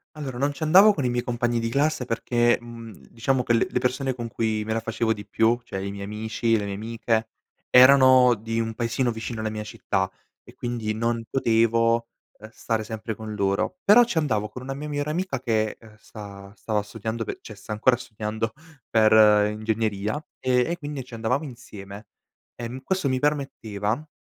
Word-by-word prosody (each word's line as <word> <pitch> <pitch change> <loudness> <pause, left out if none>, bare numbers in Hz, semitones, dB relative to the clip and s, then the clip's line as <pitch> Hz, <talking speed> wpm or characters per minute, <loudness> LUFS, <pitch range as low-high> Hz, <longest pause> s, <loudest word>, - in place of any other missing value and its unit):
Allora, 135 -5 -6
non 140 +2 0
ci - - -14
andavo 190 +7 +7
con 145 - -3
i 125 - +2
miei 120 0 -1
compagni 120 -1 -1
di 115 - -2
classe 140 +1 +1
perché, 120 0 +1
mhmm, 115 -1 -10 0.2
diciamo 125 +3 0
che 120 - +1
le 115 - +3
le - - -1
persone 130 +1 -1
con 120 -2 -5
cui 110 -2 -1
me 110 - -4
la 115 - 0
facevo 110 0 -1
di 105 -2 -3
più, 115 +2 +2
cioè 95 -4 -5
i 100 - -3
miei 100 0 -6
amici, 110 +2 -1
le 105 -2 -1
mie 100 - -4
amiche, 110 +1 -1 0.4
erano 130 -1 +7
di 115 +1 -3
un 115 0 -2
paesino 120 +2 0
vicino 115 0 -5
alla 110 0 -2
mia 110 0 -5
città 100 -3 -2 0.3
e - - -16
quindi 115 -3 -3
non 115 +1 -1
potevo, 115 -1 +2 0.3
ehm, 110 - -11
stare 115 -1 -2
sempre 110 0 -5
con 110 -1 -7
loro, 100 - 0
però 225 +4 +7
ci 230 -8 0
andavo 110 -9 -1
con 125 - -9
una 135 +1 -5
mia 150 +2 -6
migliore 145 0 -2
amica 170 -4 -2
che, 110 -3 -1
ehm, 110 -2 -16
sta 100 -2 -11
stava 105 -3 -2
studiando 110 +2 -5 0.2
cioè, 110 - -10
sta 100 - -11
ancora 115 +4 +3
studiando 110 -1 -4 0.4
per 110 -1 +6
ingegneria 110 +3 -2
e 125 +1 +1
e 170 - -2
quindi 145 -4 -6
ci 120 -2 -11
andavamo 125 +6 -1
insieme, 105 -6 -10 0.5
ehm, 120 +2 -7
questo 185 -2 0
mi 130 - +1
permetteva 130 -3 -2
115 Hz, 190 wpm, -25 LUFS, 110-130 Hz, 0.5 s, andavo